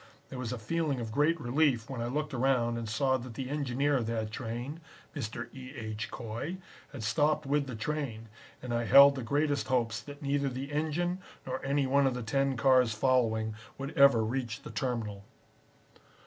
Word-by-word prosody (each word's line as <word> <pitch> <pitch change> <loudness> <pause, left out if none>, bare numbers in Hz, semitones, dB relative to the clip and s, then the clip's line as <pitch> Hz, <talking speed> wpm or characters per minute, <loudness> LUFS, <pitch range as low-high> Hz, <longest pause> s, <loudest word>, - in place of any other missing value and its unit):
There 130 - -7
was 120 -3 -3
a 125 - -3
feeling 145 +3 -1
of 115 -2 -4
great 150 +7 +2
relief 130 -3 +1
when 130 -4 -5
I 120 - -1
looked 150 +3 -2
around 125 -2 +2
and 115 -2 -5
saw 130 +4 +2
that 125 -2 -9
the 130 +1 -4
engineer 140 0 +1
of 115 -3 -2
that 110 -2 -2
train, 120 +6 -5 0.4
Mr. 115 -3 -5
E. 130 +1 -9
H. 110 -1 -5
Coy, 120 +11 -5 0.3
had 135 -7 -7
stopped 150 +6 +2
with 140 0 +1
the 125 - -5
train, 115 -3 -3 0.4
and 125 -2 -3
I 120 0 0
held 140 +6 +9
the 135 - -5
greatest 145 +4 0
hopes 120 -3 0
that 145 +1 -10
neither 140 0 +1
the 135 +3 -5
engine 160 +4 -1 0.3
nor 130 0 -4
any 140 +1 +1
one 140 +1 +3
of 130 - 0
the 125 - -4
ten 135 +3 0
cars 130 -2 +4
following 110 -3 +2 0.2
would 135 +1 -5
ever 140 -5 +6
reach 120 0 -3
the - - -8
terminal. 110 -4 -3
130 Hz, 190 wpm, -30 LUFS, 115-140 Hz, 0.4 s, held